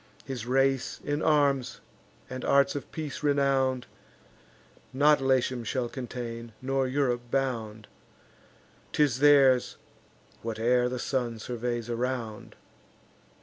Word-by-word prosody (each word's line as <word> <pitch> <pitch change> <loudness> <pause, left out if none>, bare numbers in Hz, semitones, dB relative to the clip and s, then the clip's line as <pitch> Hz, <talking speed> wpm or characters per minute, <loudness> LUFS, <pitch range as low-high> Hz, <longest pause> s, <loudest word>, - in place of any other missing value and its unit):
His 125 -4 -5
race, 135 0 +1
in 145 +1 -2
arms 140 -4 +2 0.5
and 130 0 -6
arts 140 0 +3
of 145 - -6
peace 155 -3 -5
renown'd, 135 -3 +1 1.1
Not 145 +2 +4
Latium 130 -2 +1
shall 125 +1 -2
contain, 120 -3 -6
nor 135 0 0
Europe 130 -2 0
bound: 115 -5 -2 1.1
'Tis 140 -5 +2
theirs 135 -3 +5 0.6
whate'er 120 +2 +1
the 125 - -3
sun 120 -2 -2
surveys 120 0 -3
around." 120 -2 -4
130 Hz, 105 wpm, -28 LUFS, 120-135 Hz, 1.1 s, theirs